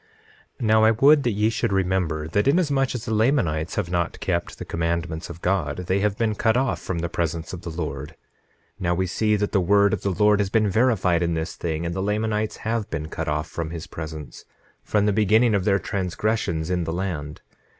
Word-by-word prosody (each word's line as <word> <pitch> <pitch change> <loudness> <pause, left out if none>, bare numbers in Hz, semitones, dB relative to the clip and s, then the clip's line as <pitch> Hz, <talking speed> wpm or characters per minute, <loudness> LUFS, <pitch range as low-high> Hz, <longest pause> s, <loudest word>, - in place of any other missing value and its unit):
9:14 120 - -2
Now 110 0 +4
I 110 - +7
would 140 +7 +5
that 120 - 0
ye 105 +2 +1
should 115 - -1
remember, 90 -5 0
that 100 +8 +1
inasmuch 140 -4 +2
as 120 - -5
the 110 - -2
Lamanites 105 - +1
have 90 -4 -2
not 85 -1 -1
kept 85 -2 -2
the - - -7
commandments 85 0 -2
of 85 0 -10
God, 90 -2 -1
they 95 +2 +1
have 105 0 0
been 115 -2 +1
cut 110 +2 +2
off 120 -10 0
from 90 - -3
the 85 +1 -1
presence 85 -1 -3
of 90 - -6
the 85 - -6
Lord. 75 -3 -5 0.6
Now 85 -1 0
we 95 +2 0
see 105 +4 +1
that 105 0 -1
the 100 - +2
word 100 +2 +4
of - - -1
the 100 - -1
Lord 105 +2 +3
has 100 -1 +1
been 110 0 +2
verified 100 -6 +2
in 85 -1 0
this 80 0 -3
thing, 80 0 -3
and 85 - -2
the 95 - -2
Lamanites 105 +1 -1
have 110 -1 -1
been 80 -1 -4
cut 80 0 -4
off 75 +1 -1
from 80 -2 -4
his 80 -1 -6
presence, 80 -2 -8 0.4
from 105 -1 +1
the 105 - +2
beginning 110 +3 +4
of 100 -3 +1
their 100 -2 +4
transgressions 90 -3 -2
in 90 -2 0
the 80 - -3
land. 85 -5 -4
95 Hz, 220 wpm, -24 LUFS, 85-110 Hz, 0.6 s, I